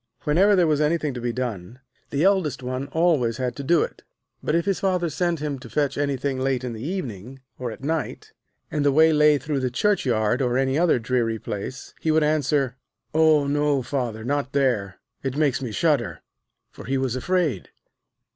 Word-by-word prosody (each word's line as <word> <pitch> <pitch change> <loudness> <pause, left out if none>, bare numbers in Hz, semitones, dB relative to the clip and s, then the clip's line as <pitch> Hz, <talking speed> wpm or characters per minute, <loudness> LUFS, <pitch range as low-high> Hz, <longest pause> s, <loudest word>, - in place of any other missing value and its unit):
Whenever 190 +7 +4
there 180 -2 +4
was 155 -2 +2
anything 150 -2 +1
to 125 - -6
be 120 0 -1
done, 115 -3 -5 0.3
the 140 +3 0
eldest 190 -10 +2
one 130 +2 -3
always 145 -7 +1
had 125 -1 -2
to 140 - -6
do 165 +3 +3
it. - - -7 0.4
But 155 - 0
if 170 - +1
his 195 -2 0
Father 180 -4 0
sent 170 0 -1
him 145 -3 -3
to 125 -2 -11
fetch 145 +1 0
anything 140 -2 -1
late 130 -1 0
in 125 -2 -4
the 110 - -8
evening, 130 - -5 0.2
or 125 -1 -3
at 110 +3 -9
night, 160 +2 -3 0.4
and 150 - 0
the 145 - +4
way 160 +3 +5
lay 150 0 +5
through 145 +1 -2
the 130 -1 0
churchyard, 125 - +1
or 125 -1 +1
any 135 0 +1
other 170 -1 +3
dreary 115 -1 0
place, 105 +5 -6
he 160 - -1
would 155 0 +4
answer: 145 -3 +1 0.4
'Oh 155 -2 +4
no, 145 -1 +1
Father, 120 -4 -3
not 140 +2 -2
there; 120 -9 0 0.2
it 135 0 -3
makes 145 -4 +1
me 125 -4 -4
shudder!' 145 0 0 0.5
For - - -11
he 135 +2 0
was 130 -2 -1
afraid. 155 - -1
140 Hz, 195 wpm, -24 LUFS, 125-155 Hz, 0.5 s, way